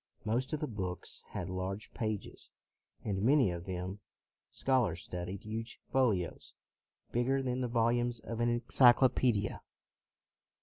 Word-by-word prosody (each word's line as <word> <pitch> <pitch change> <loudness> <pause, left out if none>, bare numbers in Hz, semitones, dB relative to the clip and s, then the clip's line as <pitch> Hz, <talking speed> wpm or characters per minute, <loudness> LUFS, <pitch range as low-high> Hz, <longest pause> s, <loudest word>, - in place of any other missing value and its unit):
Most 120 +4 0
of 155 - -1
the 150 - -2
books 95 -6 -5
had 90 - -4
large 95 +2 -4
pages, 110 -3 -4 0.5
and 95 -2 -1
many 130 -3 +4
of 85 0 -5
them. 95 +2 -4 0.5
Scholars 120 -11 +1
studied 90 +2 -5
huge 115 +2 -5
folios, 110 -10 0 0.6
bigger 135 +3 +1
than 125 0 -1
the 125 - 0
volumes 120 0 +1
of 115 +1 -6
an 120 0 +3
enclyclo 120 +2 +6
pedia. 110 -6 0
115 Hz, 130 wpm, -33 LUFS, 95-125 Hz, 0.6 s, enclyclo